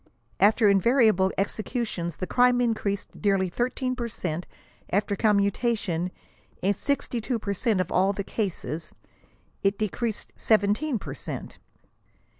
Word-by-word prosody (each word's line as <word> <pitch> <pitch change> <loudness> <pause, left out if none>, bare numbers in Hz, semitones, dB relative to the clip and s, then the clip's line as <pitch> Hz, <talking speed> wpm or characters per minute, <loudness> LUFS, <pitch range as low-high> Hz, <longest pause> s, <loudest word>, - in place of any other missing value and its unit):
*< 115 - -38
After 220 0 +2
invariable 200 -1 +4
executions 200 - -2
the - - -3
crime 245 +3 +4
increased 215 -5 -2
nearly 195 -2 +2
13 255 +5 -1
per 240 -2 -3
cent; 175 -6 -4 0.4
after 200 +2 +1
commutation," 200 -3 +1 0.5
in 200 +2 +3
62; 245 0 -1
per 205 -2 -3
cent 210 0 +1
of 185 - -1
all 190 +2 +3
the 200 0 -3
cases, 170 -6 -4 0.3
" - - -37
it 195 0 +1
decreased 215 +1 -2
17 220 +6 +2
per - - -7
cent. - - -6
205 Hz, 130 wpm, -26 LUFS, 190-235 Hz, 0.5 s, invariable